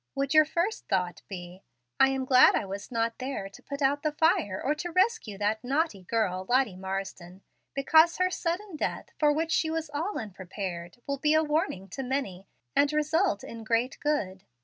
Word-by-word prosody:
Would 275 Hz, +1 st, 0 dB
your 310 Hz, 0 st, +7 dB
first 345 Hz, +7 st, -2 dB
thought 180 Hz, -2 st, -1 dB
be, 180 Hz, -1 st, -8 dB, 0.4 s
'I 270 Hz, -, +7 dB
am 265 Hz, -1 st, -1 dB
glad 255 Hz, -1 st, +7 dB
I -, -, 0 dB
was 200 Hz, +4 st, -7 dB
not 230 Hz, -1 st, -1 dB
there 255 Hz, -6 st, -4 dB
to 195 Hz, -, -15 dB
put 280 Hz, 0 st, -5 dB
out 285 Hz, +2 st, +2 dB
the 305 Hz, -, 0 dB
fire 320 Hz, -, +2 dB
or 290 Hz, -, 0 dB
to 310 Hz, +4 st, -5 dB
rescue 370 Hz, -, +1 dB
that 210 Hz, +2 st, -1 dB
naughty 275 Hz, -, 0 dB
girl, 185 Hz, -2 st, -1 dB
Lottie 250 Hz, -6 st, +2 dB
Marsden, 190 Hz, -1 st, -6 dB, 0.3 s
because 315 Hz, +4 st, +5 dB
her 365 Hz, 0 st, +2 dB
sudden 360 Hz, +2 st, -3 dB
death, -, -, -3 dB
for 300 Hz, -1 st, +4 dB
which 320 Hz, +2 st, -1 dB
she 320 Hz, 0 st, +2 dB
was 320 Hz, -1 st, -3 dB
all 330 Hz, +8 st, -2 dB
unprepared, 185 Hz, -3 st, -6 dB
will 280 Hz, -1 st, -3 dB
be 300 Hz, +2 st, +3 dB
a 315 Hz, -, +4 dB
warning 300 Hz, -, -1 dB
to 270 Hz, -, -5 dB
many, 250 Hz, -8 st, -3 dB, 0.3 s
and 285 Hz, 0 st, +4 dB
result 305 Hz, -, +1 dB
in 230 Hz, -1 st, -8 dB
great 230 Hz, +3 st, 0 dB
good'? 195 Hz, -11 st, -1 dB
270 Hz, 190 wpm, -28 LUFS, 195-310 Hz, 0.4 s, your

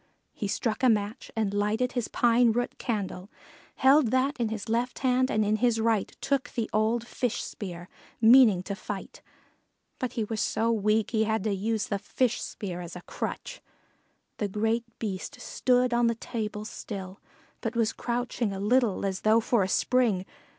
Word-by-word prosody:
He 205 Hz, -, -3 dB
struck 215 Hz, +3 st, -1 dB
a 255 Hz, -, +5 dB
match 215 Hz, +2 st, -1 dB
and 215 Hz, -3 st, 0 dB
lighted 215 Hz, +5 st, +1 dB
his 245 Hz, -3 st, -2 dB
pine 235 Hz, -1 st, +3 dB
root 245 Hz, +1 st, -2 dB
candle, 200 Hz, -4 st, -3 dB, 0.5 s
held 270 Hz, -1 st, +5 dB
that 260 Hz, +4 st, +1 dB
in 230 Hz, -2 st, +1 dB
his 220 Hz, -2 st, -5 dB
left 235 Hz, +2 st, -1 dB
hand 255 Hz, 0 st, +3 dB
and 215 Hz, 0 st, +1 dB
in 210 Hz, +1 st, +2 dB
his 235 Hz, -1 st, +2 dB
right 225 Hz, -2 st, +1 dB
took 275 Hz, 0 st, 0 dB
the 230 Hz, -3 st, -2 dB
old 220 Hz, +2 st, +1 dB
fish 245 Hz, -1 st, -2 dB
spear, 175 Hz, -3 st, -7 dB, 0.3 s
meaning 225 Hz, -5 st, +7 dB
to 200 Hz, -, -4 dB
fight, 195 Hz, 0 st, -7 dB, 0.8 s
but 255 Hz, -, -3 dB
he 225 Hz, -, -1 dB
was 215 Hz, 0 st, -3 dB
so 230 Hz, +1 st, +1 dB
weak 215 Hz, 0 st, +1 dB
he 220 Hz, -2 st, +2 dB
had 220 Hz, -2 st, 0 dB
to 215 Hz, -, 0 dB
use 215 Hz, +2 st, -1 dB
the 200 Hz, -, -2 dB
fish 245 Hz, +3 st, 0 dB
spear 180 Hz, -4 st, -5 dB
as 175 Hz, 0 st, -8 dB
a 180 Hz, -, -7 dB
crutch. -, -, -5 dB, 0.8 s
The 210 Hz, -, -1 dB
great 225 Hz, +4 st, 0 dB
Beast 210 Hz, +5 st, -5 dB
stood 250 Hz, 0 st, +1 dB
on 240 Hz, 0 st, +3 dB
the 230 Hz, -, +1 dB
table 215 Hz, -2 st, -4 dB
still, 195 Hz, -4 st, -7 dB, 0.4 s
but 225 Hz, +1 st, -3 dB
was 230 Hz, -2 st, +1 dB
crouching 240 Hz, -2 st, -2 dB
a 195 Hz, -, -5 dB
little 215 Hz, -1 st, +2 dB
as 190 Hz, -1 st, -2 dB
though 220 Hz, +1 st, +5 dB
for 230 Hz, -1 st, +2 dB
a 190 Hz, -, 0 dB
spring. 225 Hz, -5 st, +2 dB
225 Hz, 180 wpm, -28 LUFS, 205-245 Hz, 0.8 s, meaning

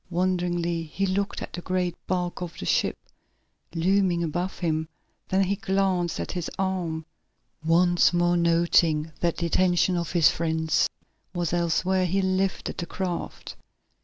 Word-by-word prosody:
Wonderingly 175 Hz, -1 st, 0 dB
he 165 Hz, +5 st, -2 dB
looked 195 Hz, +1 st, -1 dB
at -, -, -8 dB
the 175 Hz, -, -5 dB
great 180 Hz, -1 st, -1 dB
bulk 180 Hz, -1 st, -2 dB
of 175 Hz, -2 st, -6 dB
the -, -, -6 dB
ship, -, -, +1 dB, 0.8 s
looming 180 Hz, 0 st, +2 dB
above 175 Hz, +4 st, -2 dB
him, 160 Hz, -2 st, -1 dB, 0.4 s
then 190 Hz, +1 st, +3 dB
he 195 Hz, +1 st, 0 dB
glanced 190 Hz, -3 st, 0 dB
at -, -, -3 dB
his 175 Hz, -3 st, -3 dB
arm. 180 Hz, -5 st, -2 dB, 0.6 s
Once 175 Hz, +2 st, +4 dB
more, 175 Hz, 0 st, +2 dB
noting 170 Hz, -2 st, +3 dB
that 170 Hz, -1 st, 0 dB
the 170 Hz, -, -1 dB
attention 180 Hz, +1 st, +2 dB
of 170 Hz, -1 st, -2 dB
his 170 Hz, -4 st, +5 dB
friends 160 Hz, -1 st, +1 dB, 0.5 s
was 175 Hz, -2 st, -1 dB
elsewhere, 180 Hz, +2 st, +1 dB
he 190 Hz, +3 st, +1 dB
lifted 190 Hz, 0 st, -1 dB
the 170 Hz, -, -3 dB
craft. 180 Hz, -2 st, -4 dB
175 Hz, 145 wpm, -26 LUFS, 170-185 Hz, 0.8 s, his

